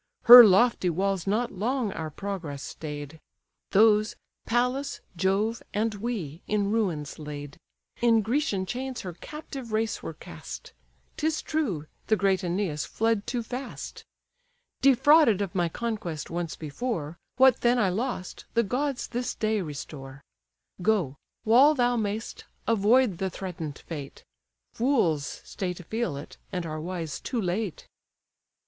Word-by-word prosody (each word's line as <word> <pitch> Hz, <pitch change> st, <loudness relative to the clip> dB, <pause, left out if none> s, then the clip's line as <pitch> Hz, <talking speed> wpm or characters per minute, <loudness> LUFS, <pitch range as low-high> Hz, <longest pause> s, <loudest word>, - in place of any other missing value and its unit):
Her 245 Hz, +1 st, +13 dB
lofty 205 Hz, -1 st, +4 dB
walls 190 Hz, +2 st, -1 dB
not 220 Hz, +5 st, +1 dB
long 230 Hz, +3 st, -1 dB
our 160 Hz, -1 st, -4 dB
progress 165 Hz, -5 st, -5 dB
stay'd; 150 Hz, 0 st, -7 dB, 0.5 s
Those, 215 Hz, +1 st, +4 dB, 0.3 s
Pallas, 250 Hz, +4 st, 0 dB, 0.2 s
Jove, 195 Hz, +6 st, +1 dB
and 220 Hz, +1 st, +1 dB
we, 195 Hz, -, -4 dB
in 205 Hz, -1 st, +1 dB
ruins 175 Hz, -12 st, -1 dB
laid: 145 Hz, -1 st, -7 dB, 0.4 s
In 230 Hz, -2 st, +4 dB
Grecian 220 Hz, -5 st, 0 dB
chains 255 Hz, +5 st, -4 dB
her 180 Hz, -2 st, -6 dB
captive 270 Hz, -, -8 dB
race 220 Hz, 0 st, -1 dB
were -, -, -6 dB
cast; -, -, -9 dB, 0.4 s
'Tis 315 Hz, 0 st, 0 dB
true, 230 Hz, -, -1 dB, 0.2 s
the 220 Hz, -, +4 dB
great 195 Hz, -2 st, +2 dB
Æneas 175 Hz, -4 st, -2 dB
fled 225 Hz, -2 st, 0 dB
too 245 Hz, -2 st, -2 dB
fast. 250 Hz, +3 st, -7 dB, 0.8 s
Defrauded 275 Hz, -, +6 dB
of 200 Hz, -2 st, -2 dB
my 175 Hz, -3 st, +1 dB
conquest 210 Hz, -7 st, -4 dB
once 170 Hz, -3 st, -3 dB
before, 160 Hz, -, -4 dB, 0.2 s
What 260 Hz, -1 st, +5 dB
then 240 Hz, +1 st, +4 dB
I 210 Hz, -6 st, +3 dB
lost, 205 Hz, -1 st, -3 dB
the 235 Hz, -, +4 dB
gods 260 Hz, +4 st, -1 dB
this 245 Hz, +1 st, -3 dB
day 215 Hz, -2 st, 0 dB
restore. 140 Hz, -3 st, -8 dB, 0.6 s
Go; 180 Hz, -9 st, +1 dB, 0.3 s
while 265 Hz, +7 st, +6 dB
thou 245 Hz, -2 st, +2 dB
may'st, 215 Hz, 0 st, -3 dB, 0.2 s
avoid 225 Hz, -2 st, +3 dB
the 190 Hz, -, 0 dB
threaten'd 170 Hz, -6 st, -6 dB
fate; 145 Hz, -5 st, -8 dB, 0.5 s
Fools 180 Hz, -, 0 dB
stay 180 Hz, -2 st, -4 dB
to 180 Hz, -, -10 dB
feel 215 Hz, -4 st, -2 dB
it, 140 Hz, -, -10 dB
and 180 Hz, -2 st, -3 dB
are 155 Hz, -1 st, -4 dB
wise 165 Hz, -3 st, -4 dB
too 245 Hz, -, -3 dB
late." 190 Hz, -1 st, -2 dB
205 Hz, 135 wpm, -27 LUFS, 170-240 Hz, 0.8 s, Her